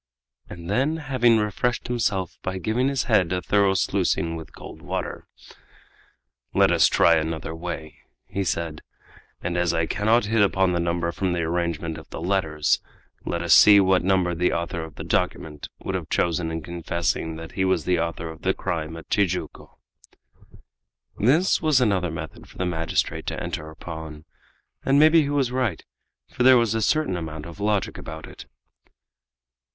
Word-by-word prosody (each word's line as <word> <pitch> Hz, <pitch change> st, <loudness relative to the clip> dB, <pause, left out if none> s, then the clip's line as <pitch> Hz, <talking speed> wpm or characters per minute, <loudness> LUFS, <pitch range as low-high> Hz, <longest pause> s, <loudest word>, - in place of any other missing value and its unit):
And 85 Hz, -1 st, -9 dB
then, 135 Hz, -, +1 dB
having 130 Hz, -6 st, +3 dB
refreshed 110 Hz, +4 st, -1 dB
himself 110 Hz, -7 st, -1 dB
by 95 Hz, 0 st, -3 dB
giving 110 Hz, +7 st, 0 dB
his 135 Hz, -2 st, 0 dB
head 95 Hz, -8 st, +2 dB
a 90 Hz, -, 0 dB
thorough 100 Hz, +1 st, +2 dB
sluicing 85 Hz, -2 st, 0 dB
with 80 Hz, -1 st, -9 dB
cold -, -, -11 dB
water: -, -, -5 dB, 1.3 s
"Let -, -, +5 dB
us -, -, +5 dB
try 85 Hz, -1 st, +4 dB
another 80 Hz, 0 st, -3 dB
way," 80 Hz, -2 st, -6 dB, 0.3 s
he 100 Hz, -, -3 dB
said, 85 Hz, -3 st, -3 dB, 0.6 s
"and 90 Hz, 0 st, -2 dB
as 90 Hz, -1 st, +1 dB
I 80 Hz, -, +1 dB
cannot 110 Hz, +6 st, +2 dB
hit 110 Hz, +1 st, +2 dB
upon 95 Hz, -2 st, +3 dB
the 85 Hz, -, 0 dB
number 85 Hz, 0 st, -1 dB
from 90 Hz, +1 st, -1 dB
the 85 Hz, -, -1 dB
arrangement 85 Hz, -1 st, -2 dB
of 80 Hz, -, -15 dB
the -, -, -7 dB
letters, 80 Hz, -4 st, +1 dB, 0.5 s
let 85 Hz, 0 st, -2 dB
us 85 Hz, -, +4 dB
see 105 Hz, -1 st, +8 dB
what 95 Hz, -1 st, +3 dB
number 95 Hz, -1 st, +2 dB
the 90 Hz, +2 st, +1 dB
author 85 Hz, -1 st, -3 dB
of 80 Hz, -2 st, -10 dB
the -, -, -7 dB
document 75 Hz, -2 st, -2 dB, 0.2 s
would -, -, -3 dB
have -, -, -4 dB
chosen 85 Hz, -1 st, 0 dB
in 80 Hz, -1 st, -4 dB
confessing 85 Hz, -1 st, -2 dB
that 80 Hz, 0 st, -8 dB
he 95 Hz, -, -1 dB
was 95 Hz, 0 st, +1 dB
the 90 Hz, -2 st, +2 dB
author 85 Hz, 0 st, -3 dB
of 80 Hz, -, -13 dB
the 95 Hz, -, +1 dB
crime 80 Hz, -3 st, -3 dB
at 80 Hz, -, -11 dB
Tijuco." 90 Hz, -3 st, -2 dB, 1.4 s
This 155 Hz, -, +3 dB
was 155 Hz, -5 st, +3 dB
another 100 Hz, -7 st, +1 dB
method 80 Hz, -, -8 dB
for -, -, -16 dB
the 90 Hz, -, -1 dB
magistrate 80 Hz, -2 st, -1 dB
to -, -, -3 dB
enter 80 Hz, 0 st, -5 dB
upon, 80 Hz, -1 st, -9 dB, 0.6 s
and 135 Hz, +1 st, +3 dB
maybe 155 Hz, +2 st, +6 dB
he 145 Hz, -, -1 dB
was 140 Hz, -4 st, +1 dB
right, 125 Hz, -9 st, -1 dB, 0.5 s
for -, -, -5 dB
there 130 Hz, 0 st, +7 dB
was 115 Hz, -2 st, +2 dB
a 115 Hz, -, 0 dB
certain 155 Hz, -3 st, +1 dB
amount 80 Hz, -3 st, -6 dB
of 85 Hz, +3 st, -10 dB
logic 105 Hz, -1 st, -1 dB
about -, -, -8 dB
it. -, -, -12 dB
90 Hz, 175 wpm, -24 LUFS, 80-105 Hz, 1.4 s, see